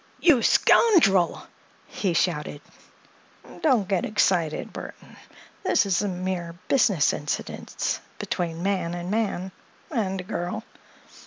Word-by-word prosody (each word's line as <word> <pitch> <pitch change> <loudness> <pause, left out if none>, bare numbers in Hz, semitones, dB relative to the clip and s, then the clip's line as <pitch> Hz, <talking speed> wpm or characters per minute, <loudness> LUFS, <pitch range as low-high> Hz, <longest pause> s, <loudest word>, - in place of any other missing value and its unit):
"You 305 -9 +5
scoundrel!" 220 - +4 0.4
he 200 -10 -2
shouted. 150 -4 -1 1.0
"Don't 250 - +3
get 190 -3 0
excited, 175 -6 0
Burthon. - - -10 0.5
This - - +3
is 195 -2 +1
a 205 - -1
mere 180 -2 -3
business 200 - +3
incident, 145 0 -3 0.2
between 170 -1 -3
man 185 -3 -1
and 175 +1 -5
man—and 195 - -3
a - - -5
girl." 180 +4 -4
185 Hz, 105 wpm, -25 LUFS, 175-215 Hz, 1.0 s, You